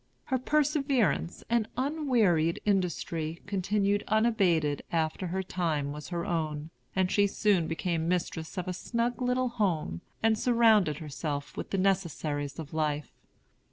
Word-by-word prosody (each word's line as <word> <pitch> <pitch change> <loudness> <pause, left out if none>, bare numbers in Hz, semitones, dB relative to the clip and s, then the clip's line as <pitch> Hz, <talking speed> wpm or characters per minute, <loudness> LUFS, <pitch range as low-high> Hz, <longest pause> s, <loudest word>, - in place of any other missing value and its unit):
Her 260 - -1
perseverance 275 - +1
and 230 -2 +1
unwearied 245 - +2
industry 170 -4 -1
continued 200 +1 +1
unabated 190 - +2
after 165 +2 0
her 190 +2 -2
time 160 -6 -1
was 150 0 -7
her 170 -1 -3
own, 155 -2 -2 0.2
and 190 0 +2
she 200 +1 +4
soon 195 -5 +2
became 165 0 -1
mistress 170 -2 -2
of 180 - -2
a 185 - -1
snug 235 +5 -2
little 250 0 +1
home, 175 - -1 0.2
and 220 -1 +3
surrounded 220 - +4
herself 145 -2 -4
with - - -5
the 195 - -1
necessaries 160 -7 0
of 160 -3 -7
life. 150 -2 -1
180 Hz, 135 wpm, -29 LUFS, 160-220 Hz, 0.2 s, she